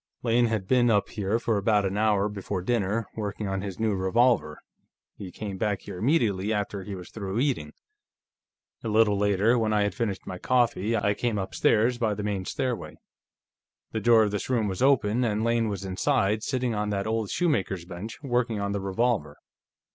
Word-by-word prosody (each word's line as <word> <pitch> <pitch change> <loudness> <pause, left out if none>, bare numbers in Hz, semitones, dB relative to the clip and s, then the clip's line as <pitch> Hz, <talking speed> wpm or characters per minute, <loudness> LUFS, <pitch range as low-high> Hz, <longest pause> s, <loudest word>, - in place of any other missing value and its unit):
"Lane 120 0 +3
had 110 -4 -2
been 120 0 +4
up 105 -3 +2
here 105 +1 -1
for 115 -2 0
about 105 0 +2
an 95 0 -1
hour 105 -1 +2
before 100 -2 -4
dinner, 110 0 0
working 105 -1 -4
on 95 0 -2
his 100 -1 -6
new 110 -1 +1
revolver; 95 -3 +2 0.6
he 95 -3 -8
came 100 -2 -6
back 105 -3 0
here 90 - -8
immediately 110 - +1
after 105 -2 -2
he 100 +1 -6
was 90 -2 -10
through 100 -2 -4
eating. 125 - 0 1.1
A - - -3
little 110 -1 +3
later, 105 +4 +2
when 110 -1 +1
I 105 -1 +3
had 105 - -1
finished 105 -6 -3
my 90 -1 -6
coffee, 115 -3 +1
I 105 0 +1
came 115 0 -1
upstairs, 110 +5 +1
by 110 -4 +1
the 105 - -5
main 100 -3 -2
stairway. 130 -2 -3 1.0
The 110 - -2
door 115 -1 +6
of 105 - 0
this 105 +3 -3
room 115 -5 +1
was 95 -2 -4
open, 125 -3 +3
and 110 -2 0
Lane 115 -1 +1
was 100 -1 -4
inside, 105 +2 +1
sitting 125 -1 -1
on 105 0 -1
that 100 -1 -1
old 110 -2 -1
shoemaker's 100 - 0
bench, 95 +5 -7
working 120 -4 0
on 100 0 -2
the 100 -1 -2
revolver. 95 -6 -1
105 Hz, 190 wpm, -26 LUFS, 100-115 Hz, 1.1 s, door